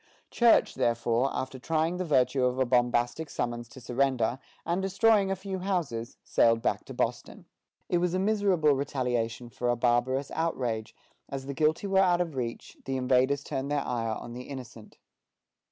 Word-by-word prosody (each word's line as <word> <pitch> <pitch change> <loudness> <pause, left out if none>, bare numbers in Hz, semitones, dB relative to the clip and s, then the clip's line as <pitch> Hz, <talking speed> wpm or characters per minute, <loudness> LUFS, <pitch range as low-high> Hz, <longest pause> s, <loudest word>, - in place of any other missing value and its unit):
Church, 235 -1 +4
therefore, 120 +2 +1
after 130 0 -4
trying 160 +5 0
the 185 - -2
virtue 130 -3 +2
of 125 0 +1
a 130 - +2
bombastic 120 +4 +1
summons 120 -1 -3
to 115 - -12
surrender, 125 0 0 0.3
and 175 +3 0
destroying 195 +1 +3
a 195 - 0
few 190 0 -5
houses, 165 -12 -2
sailed 115 0 +3
back - - 0
to - - -8
Boston. - - -3 0.4
It 175 - +1
was 180 0 0
a - - +2
miserable 190 -6 +2
retaliation 125 -4 -2
for 120 +2 -2
a 120 - +3
barbarous 125 +3 +1
outrage; 125 -9 -2 0.3
as 135 -1 -5
the 140 - -4
guilty 155 +6 +1
were 195 -1 +2
out 180 -2 +4
of 170 -3 -1
reach, 120 -3 -5
the 135 0 -2
invaders 130 +2 +2
turned 135 0 -3
their 145 -1 0
ire 115 -2 -1
on 120 - -8
the 125 +1 -7
innocent. 125 -5 -10
130 Hz, 170 wpm, -28 LUFS, 120-170 Hz, 0.4 s, Church